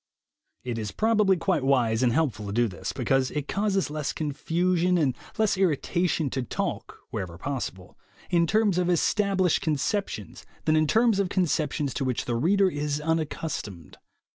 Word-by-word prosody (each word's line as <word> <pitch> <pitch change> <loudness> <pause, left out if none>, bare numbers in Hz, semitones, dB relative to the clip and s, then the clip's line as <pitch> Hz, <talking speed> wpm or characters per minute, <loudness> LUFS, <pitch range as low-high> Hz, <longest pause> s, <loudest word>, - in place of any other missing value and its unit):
It 120 -2 -3
is 105 -2 -4
probably 210 - +3
quite 170 -2 0
wise 125 -4 +2
and 125 -2 +3
helpful 115 -8 0
to - - -4
do 120 +3 +2
this, 95 -5 -5
because 135 -1 +1
it 150 -2 -4
causes 195 -5 0
less 150 -2 -2
confusion 175 +4 0
and 140 -6 +1 0.2
less 215 -3 +2
irritation 175 -3 +1
to 130 - -1
talk, 125 - -4
wherever 85 -3 -5
possible, 95 -6 -5 0.3
in 170 -1 +3
terms 210 -3 +2
of 180 -1 +1
established 190 +1 +2
conceptions 150 - -2 0.2
than 155 - +3
in 155 0 +3
terms 225 +2 +3
of 195 -2 +1
conceptions 155 -6 0
to - - -2
which 130 -2 -1
the 120 - -2
reader 190 +10 +3
is 150 -3 -2
unaccustomed. 150 - -3
155 Hz, 160 wpm, -26 LUFS, 130-185 Hz, 0.3 s, probably